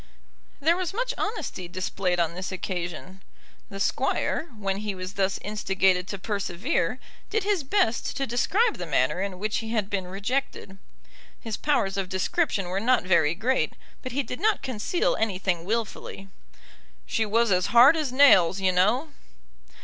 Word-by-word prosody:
There 320 Hz, +4 st, +3 dB
was 370 Hz, +1 st, -3 dB
much -, -, -1 dB
honesty 340 Hz, -, -4 dB
displayed 180 Hz, 0 st, -2 dB
on 170 Hz, -1 st, +1 dB
this 185 Hz, +2 st, -5 dB
occasion. 185 Hz, 0 st, -5 dB, 0.5 s
The 195 Hz, -, -8 dB
Squire, 310 Hz, +9 st, 0 dB
when 195 Hz, -2 st, -2 dB
he 205 Hz, -1 st, -4 dB
was 185 Hz, +1 st, -6 dB
thus 195 Hz, -1 st, 0 dB
instigated 190 Hz, -3 st, +1 dB
to 200 Hz, -, -5 dB
persevere, 200 Hz, -, -1 dB, 0.3 s
did 440 Hz, -2 st, 0 dB
his 400 Hz, -5 st, 0 dB
best 265 Hz, -, 0 dB
to 275 Hz, -, 0 dB
describe 385 Hz, -, +1 dB
the 175 Hz, -, -5 dB
manner 135 Hz, +4 st, +1 dB
in 195 Hz, -2 st, -3 dB
which 210 Hz, +3 st, -1 dB
he 225 Hz, 0 st, -5 dB
had 210 Hz, -3 st, -1 dB
been 190 Hz, -3 st, -2 dB
rejected. 200 Hz, 0 st, -3 dB, 0.6 s
His 225 Hz, -2 st, -4 dB
powers 200 Hz, -10 st, 0 dB
of 190 Hz, -2 st, -2 dB
description 190 Hz, -, 0 dB
were 190 Hz, +2 st, -1 dB
not 245 Hz, +1 st, +2 dB
very 170 Hz, -3 st, +3 dB
great, 240 Hz, +7 st, 0 dB, 0.3 s
but 255 Hz, -, -6 dB
he 280 Hz, +3 st, 0 dB
did 250 Hz, -, -6 dB
not 435 Hz, 0 st, +1 dB
conceal 255 Hz, +7 st, 0 dB
anything 185 Hz, -5 st, -1 dB
wilfully. 215 Hz, -2 st, -4 dB, 0.8 s
"She 225 Hz, -, 0 dB
was 225 Hz, +1 st, +2 dB
as 180 Hz, -1 st, +2 dB
hard 250 Hz, +6 st, +7 dB
as 305 Hz, -5 st, -1 dB
nails, 195 Hz, -10 st, +6 dB
you 190 Hz, -1 st, +2 dB
know." 240 Hz, -, +2 dB
205 Hz, 160 wpm, -26 LUFS, 185-260 Hz, 0.8 s, hard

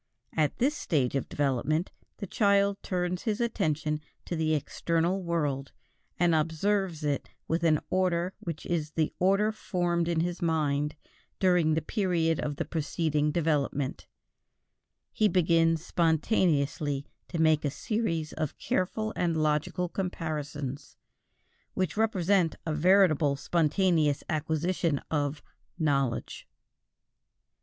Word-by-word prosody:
At 155 Hz, -2 st, +1 dB
this 280 Hz, +5 st, +2 dB
stage 140 Hz, -, 0 dB
of 135 Hz, -, -2 dB
development, 145 Hz, +4 st, 0 dB, 0.3 s
the 205 Hz, -, -5 dB
child 200 Hz, 0 st, +2 dB
turns 180 Hz, -1 st, -2 dB
his 215 Hz, -2 st, -1 dB
attention 155 Hz, -9 st, 0 dB, 0.2 s
to 175 Hz, -, -3 dB
the 155 Hz, -1 st, +1 dB
external 170 Hz, +5 st, 0 dB
world, 150 Hz, -6 st, -2 dB, 0.4 s
and 175 Hz, -1 st, +3 dB
observes 165 Hz, +2 st, 0 dB
it 145 Hz, -2 st, -1 dB, 0.2 s
with 165 Hz, +1 st, 0 dB
an 155 Hz, -3 st, +4 dB
order 185 Hz, -1 st, +1 dB
which 165 Hz, -3 st, -6 dB
is 155 Hz, -3 st, -2 dB
the 155 Hz, -2 st, 0 dB
order 195 Hz, +4 st, +3 dB
formed 175 Hz, -5 st, -1 dB
in 170 Hz, -2 st, +1 dB
his 175 Hz, +2 st, -2 dB
mind 150 Hz, -3 st, 0 dB, 0.4 s
during 175 Hz, -4 st, +3 dB
the 160 Hz, -, -1 dB
period 170 Hz, -4 st, +1 dB
of 145 Hz, -, -2 dB
the 165 Hz, -, -3 dB
preceding 155 Hz, -1 st, 0 dB
development; 145 Hz, -4 st, -1 dB, 1.0 s
he 215 Hz, -, +3 dB
begins 165 Hz, -3 st, +2 dB
spontaneously 155 Hz, -4 st, +1 dB, 0.2 s
to 170 Hz, -, -4 dB
make 155 Hz, -1 st, +4 dB
a 145 Hz, -, +1 dB
series 165 Hz, -, -2 dB
of 155 Hz, -3 st, -3 dB
careful 215 Hz, +4 st, -1 dB
and 170 Hz, -2 st, 0 dB
logical 155 Hz, +4 st, 0 dB
comparisons 150 Hz, -7 st, -4 dB, 0.8 s
which 185 Hz, -4 st, -1 dB
represent 195 Hz, -5 st, +2 dB
a 160 Hz, -, -1 dB
veritable 155 Hz, -3 st, +4 dB
spontaneous 160 Hz, -1 st, +1 dB
acquisition 160 Hz, 0 st, 0 dB
of 145 Hz, -1 st, -1 dB, 0.3 s
"knowledge." 140 Hz, -7 st, -1 dB
165 Hz, 120 wpm, -29 LUFS, 150-180 Hz, 1.0 s, an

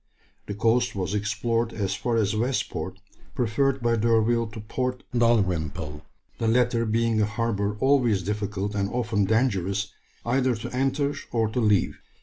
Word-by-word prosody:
The 100 Hz, -, -4 dB
coast 115 Hz, +3 st, +2 dB
was 95 Hz, 0 st, -2 dB
explored 110 Hz, +3 st, -1 dB
as 100 Hz, -3 st, -1 dB
far 120 Hz, +3 st, -1 dB
as 110 Hz, -2 st, +1 dB
West 120 Hz, +4 st, 0 dB
Port, -, -, -5 dB, 0.4 s
preferred 130 Hz, +3 st, +1 dB
by 115 Hz, 0 st, +2 dB
D'Urville 115 Hz, +1 st, +2 dB
to 110 Hz, +1 st, -9 dB
Port 125 Hz, +4 st, -3 dB
Dalrymple, 90 Hz, -10 st, +1 dB, 0.4 s
the 115 Hz, -, 0 dB
latter 120 Hz, 0 st, +2 dB
being 115 Hz, 0 st, +1 dB
a -, -, +4 dB
harbour 105 Hz, -1 st, -1 dB
always 125 Hz, -7 st, +3 dB
difficult 105 Hz, 0 st, -2 dB
and 100 Hz, -1 st, -1 dB
often 115 Hz, -4 st, 0 dB
dangerous 100 Hz, -3 st, 0 dB, 0.3 s
either 130 Hz, +1 st, +2 dB
to 120 Hz, +2 st, -6 dB
enter 135 Hz, +2 st, +1 dB, 0.2 s
or 115 Hz, -2 st, +1 dB
to 115 Hz, -, -2 dB
leave. 105 Hz, -4 st, +2 dB
115 Hz, 150 wpm, -25 LUFS, 100-120 Hz, 0.4 s, a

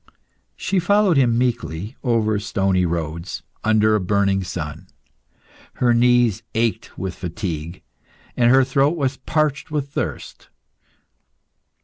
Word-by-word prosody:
She 190 Hz, 0 st, -1 dB
followed 200 Hz, 0 st, +3 dB
him 120 Hz, -4 st, +3 dB
meekly, 115 Hz, -, -2 dB
over 110 Hz, -4 st, +1 dB
stony 95 Hz, -4 st, 0 dB
roads, 85 Hz, 0 st, -4 dB, 0.2 s
under 110 Hz, 0 st, +3 dB
a 105 Hz, -, +3 dB
burning 100 Hz, 0 st, +1 dB
sun. 75 Hz, -5 st, -6 dB, 0.9 s
Her 120 Hz, -1 st, +2 dB
knees 120 Hz, -3 st, +3 dB
ached 115 Hz, 0 st, 0 dB
from 95 Hz, +1 st, -5 dB
fatigue, 85 Hz, -2 st, -5 dB, 0.5 s
and 120 Hz, -1 st, +3 dB
her 135 Hz, +1 st, +6 dB
throat 135 Hz, +5 st, +1 dB
was 135 Hz, -2 st, -1 dB
parched 150 Hz, +1 st, -1 dB
with 145 Hz, -2 st, -2 dB
thirst. -, -, -5 dB
115 Hz, 115 wpm, -21 LUFS, 95-130 Hz, 0.9 s, her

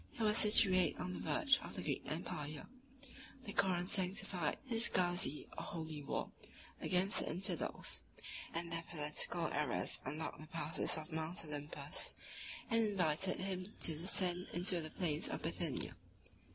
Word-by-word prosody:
He 230 Hz, -, -2 dB
was 210 Hz, 0 st, +4 dB
situate 195 Hz, -4 st, +5 dB
on 180 Hz, 0 st, -3 dB
the -, -, -5 dB
verge 290 Hz, -4 st, +3 dB
of -, -, -7 dB
the -, -, -4 dB
Greek -, -, -1 dB
empire: 150 Hz, 0 st, -4 dB, 0.8 s
the 205 Hz, -, -6 dB
Koran 185 Hz, -3 st, +2 dB
sanctified 185 Hz, -3 st, +2 dB
his 230 Hz, -2 st, +3 dB
gazi, 175 Hz, -4 st, +1 dB
or -, -, -4 dB
holy 160 Hz, -3 st, -5 dB
war, 140 Hz, -, -2 dB, 0.5 s
against 185 Hz, +2 st, +3 dB
the -, -, -1 dB
infidels; 180 Hz, +4 st, -3 dB, 0.5 s
and 170 Hz, 0 st, -2 dB
their 165 Hz, 0 st, -1 dB
political 160 Hz, +2 st, +2 dB
errors 145 Hz, -4 st, +1 dB
unlocked 150 Hz, +4 st, -4 dB
the 155 Hz, -, -9 dB
passes 165 Hz, -2 st, 0 dB
of 155 Hz, +2 st, -7 dB
Mount 160 Hz, +2 st, -2 dB
Olympus, 145 Hz, -1 st, -3 dB, 0.6 s
and 230 Hz, 0 st, +5 dB
invited 185 Hz, -3 st, +2 dB
him 190 Hz, +1 st, -3 dB
to 160 Hz, -, +4 dB
descend 180 Hz, +2 st, +1 dB
into 175 Hz, 0 st, +1 dB
the 155 Hz, -, -6 dB
plains 155 Hz, -3 st, 0 dB
of -, -, -4 dB
Bithynia. -, -, -1 dB
175 Hz, 150 wpm, -38 LUFS, 155-190 Hz, 0.8 s, situate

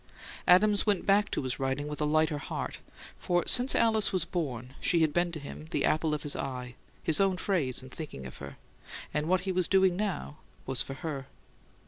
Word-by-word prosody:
Adams 205 Hz, +4 st, +5 dB
went 205 Hz, -3 st, +2 dB
back 200 Hz, +1 st, +3 dB
to -, -, -2 dB
his 130 Hz, 0 st, -2 dB
writing 135 Hz, +2 st, -1 dB
with 150 Hz, 0 st, -5 dB
a -, -, +2 dB
lighter 155 Hz, 0 st, +2 dB
heart; -, -, -5 dB, 0.4 s
for 175 Hz, -1 st, +1 dB
since 250 Hz, +2 st, +4 dB
Alice 220 Hz, -3 st, +3 dB
was 185 Hz, -4 st, 0 dB
born 130 Hz, -8 st, -4 dB
she 170 Hz, -2 st, +3 dB
had 155 Hz, -2 st, +2 dB
been 175 Hz, 0 st, +1 dB
to 160 Hz, -, -5 dB
him 150 Hz, +2 st, -9 dB
the -, -, 0 dB
apple 155 Hz, 0 st, +1 dB
of 150 Hz, -, -6 dB
his 145 Hz, -, 0 dB
eye, 125 Hz, -2 st, -4 dB, 0.3 s
his 160 Hz, -2 st, +3 dB
own 190 Hz, -2 st, +2 dB
phrase 145 Hz, -, -1 dB
in 130 Hz, -, -10 dB
thinking 145 Hz, -, -7 dB
of 65 Hz, -, -9 dB
her; -, -, -9 dB, 0.6 s
and 150 Hz, +1 st, -1 dB
what 185 Hz, +1 st, +2 dB
he 190 Hz, +1 st, -2 dB
was 185 Hz, -1 st, +1 dB
doing 190 Hz, -2 st, +4 dB
now 190 Hz, -7 st, -3 dB, 0.3 s
was 135 Hz, -1 st, -1 dB
for 135 Hz, -, -4 dB
her. 140 Hz, -2 st, -5 dB
160 Hz, 205 wpm, -30 LUFS, 140-185 Hz, 0.6 s, Adams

